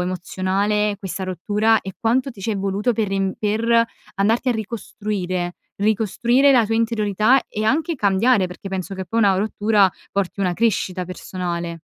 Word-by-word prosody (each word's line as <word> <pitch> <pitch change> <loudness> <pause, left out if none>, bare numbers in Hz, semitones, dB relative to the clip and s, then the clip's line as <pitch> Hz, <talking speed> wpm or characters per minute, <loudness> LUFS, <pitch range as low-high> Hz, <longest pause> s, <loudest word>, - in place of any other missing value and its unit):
emozionale, 195 +3 -1
questa 190 -1 -5
rottura? 210 +4 +1
E 190 -1 -7
quanto 250 +4 +1
ti 210 -5 -13
ci 220 +3 -1
è - - -2
voluto 200 +5 0
per 215 -2 0
riem 195 -1 -1
per 215 +2 -1 0.5
andarti 225 +6 +1
a - - +4
ricostruire, 200 -5 -4 0.2
ricostruire 235 +6 +3
la 240 -3 +5
tua 225 +1 -1
interiorità 225 +2 +2
e 215 +1 -3
anche 315 +7 +1
cambiare? 200 0 +3
Perché 180 +2 -9
penso 190 0 -4
che 190 0 -5
poi 230 - -2
una 200 -3 +4
rottura 205 -1 +2 0.2
porti 200 0 -2
una 180 -2 +1
crescita 190 -4 0
personale. 175 -2 -5
205 Hz, 160 wpm, -21 LUFS, 190-225 Hz, 0.5 s, la